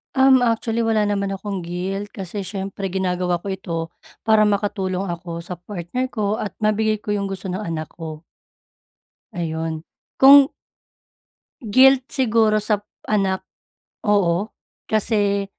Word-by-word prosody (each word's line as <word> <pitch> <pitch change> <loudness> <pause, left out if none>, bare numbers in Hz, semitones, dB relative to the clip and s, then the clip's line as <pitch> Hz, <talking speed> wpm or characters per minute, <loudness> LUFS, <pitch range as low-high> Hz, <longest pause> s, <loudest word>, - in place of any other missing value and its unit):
Um, 265 -1 +6
actually 230 0 0
wala 220 -2 +2
naman 200 -1 -1
akong 195 -1 -4
guilt 190 +4 -4
kasi 195 +1 -5
siyempre 195 0 -4
ginagawa 180 -1 0
ko 185 - -9
ito 190 -3 -4 0.5
para 220 -1 +6
makatulong 200 -2 0
ako 170 -1 -5
sa 175 +2 -6
partner 195 +8 -4
ko 210 -2 0
at 215 -2 -4
mabigay 215 0 +1
ko 210 0 -2
yung 200 -1 -2
gusto 195 0 -4
ng 185 +3 -3
anak 160 -4 -4
ko. 160 -2 -8 1.1
Ayun. 160 -2 -3 0.4
Kung 275 +1 +8 1.2
guilt 265 0 +7
siguro 225 -4 +2
sa 210 -1 0 0.2
anak, 195 -3 0 0.6
oo. 200 -1 +2 0.4
Kasi 205 -2 +1
200 Hz, 125 wpm, -21 LUFS, 180-215 Hz, 1.2 s, Kung